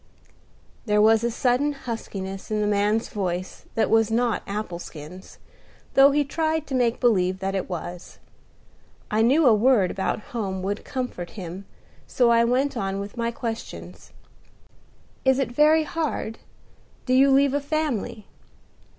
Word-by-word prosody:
There 210 0 +3
was 220 +1 +5
a 235 - +1
sudden 250 +5 +1
huskiness 195 -7 -6
in 215 -1 -1
the 210 - +1
man's 210 +2 +1
voice 185 -2 -4
that 225 - +2
was 225 -1 +3
not 235 0 +1
apple 200 -4 -4
skins, 175 +3 -11 0.6
though 275 +1 +7
he 290 +1 +2
tried 315 +1 -1
to 275 - -7
make 245 -2 +1
believe 185 -6 +2
that 195 0 -3
it 190 -1 -3
was. 175 0 -7 0.9
I 215 +1 +2
knew 275 +8 +4
a 240 - +7
word 215 -4 +3
about 195 - -2
home 190 -5 -3
would 200 +2 -3
comfort 250 -10 -5
him, 185 +1 -7 0.4
so 245 -2 +3
I 230 0 +5
went 265 +4 +1
on 195 -3 -2
with 200 +2 -7
my 235 -1 -1
questions. 230 -1 -7 1.1
"It 265 -1 +3
is 270 - +1
very 305 +4 +5
hard. 305 -8 -3 0.7
Do 255 - +1
you 270 +2 +6
leave 275 0 +4
a 285 - 0
family?" 265 -8 -2
225 Hz, 150 wpm, -24 LUFS, 195-265 Hz, 1.1 s, though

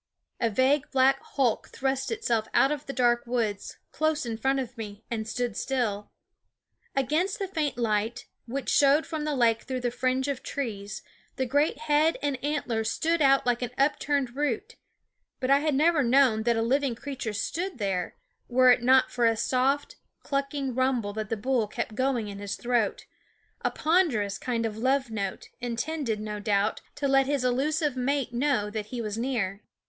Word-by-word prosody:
A 230 - +2
vague 260 +5 +2
black 270 +1 +4
hulk 255 -6 0
thrust 265 0 -2
itself 235 - 0
out 275 - +5
of 295 -1 -4
the - - -3
dark 240 -2 +2
woods, 225 -4 -2
close 310 -3 0
in 230 -1 -3
front 270 +4 +1
of 255 -2 -5
me, 215 -2 -8
and 220 -2 -2
stood 240 -1 -2
still. 220 -6 -1 0.9
Against 305 +9 +1
the 395 - -3
faint 310 -8 -2
light, 220 -1 -1 0.2
which 270 +3 -4
showed 285 +2 +4
from 310 -2 -4
the 300 -1 -1
lake 230 -3 +3
through 255 -1 -4
the 245 -1 -1
fringe 255 +2 0
of 280 -3 -2
trees, 210 -7 -5 0.3
the 260 - -1
great 290 +4 +1
head 310 +1 +3
and 275 -3 -2
antlers 245 -7 -1
stood 330 +7 0
out 275 -2 +4
like 245 0 +1
an 245 - -2
upturned 280 -2 +1
root; 295 - -2 0.6
but 255 0 0
I 280 - +6
had 300 -1 0
never 315 +2 +4
known 250 -3 +4
that 235 - +3
a 225 - +1
living 265 +1 +1
creature 260 -3 -5
stood 340 - -3
there 190 -5 -2 0.3
were 255 0 +5
it 245 - +4
not 260 +2 +4
for 240 -2 +2
a 225 -1 +2
soft, 275 - 0 0.3
clucking 275 -1 -2
rumble 250 -5 0
that 215 -1 -4
the 225 - -1
bull 240 0 0
kept 215 - -4
going 255 -2 0
in 200 -1 -7
his 200 -1 -4
throat, 240 -4 0 0.6
a - - +1
ponderous 295 - +1
kind 235 -2 -1
of 215 -1 -3
love 260 +1 +1
note, 200 -3 -4
intended, 240 0 -2
no 210 0 -4
doubt, 205 0 0
to 285 - -1
let 270 0 +4
his 280 -2 0
elusive 290 +3 +1
mate 260 0 -1
know 240 -5 +1
that 210 -1 -4
he 245 +2 -5
was 215 -3 -3
near. 225 -5 -2
255 Hz, 180 wpm, -27 LUFS, 225-280 Hz, 0.9 s, I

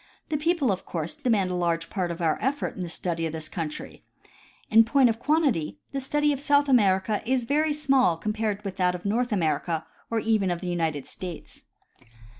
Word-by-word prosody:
The 305 - 0
people 305 - +1
of 190 - -3
course, 165 -1 -4
demand 225 -10 +1
a - - -2
large 170 -2 -1
part 185 -3 -1
of 170 0 -4
our 160 -2 +1
effort 280 +2 -1
in 190 - -6
the 175 - -4
study 165 -1 -2
of 160 - -6
this 160 -1 -4
countr3^ 160 -3 -6 0.7
In 225 +1 +8
point 250 +2 +4
of 225 0 -2
quantity, 280 - +1
the 275 - -2
study 295 +2 +1
of 275 - -4
South 285 0 +3
America 210 -4 +3
is 250 +1 0
very 300 +4 +1
small 270 - +2
compared 210 +2 -2
with 190 -2 -5
that 180 -1 +2
of 180 - -9
North 240 +4 0
America 165 -3 0 0.2
or 230 - 0
even 215 -4 +1
of 175 -1 -1
the 180 - -6
United 160 -5 -1
States. 180 -4 -8
205 Hz, 200 wpm, -26 LUFS, 175-265 Hz, 0.7 s, In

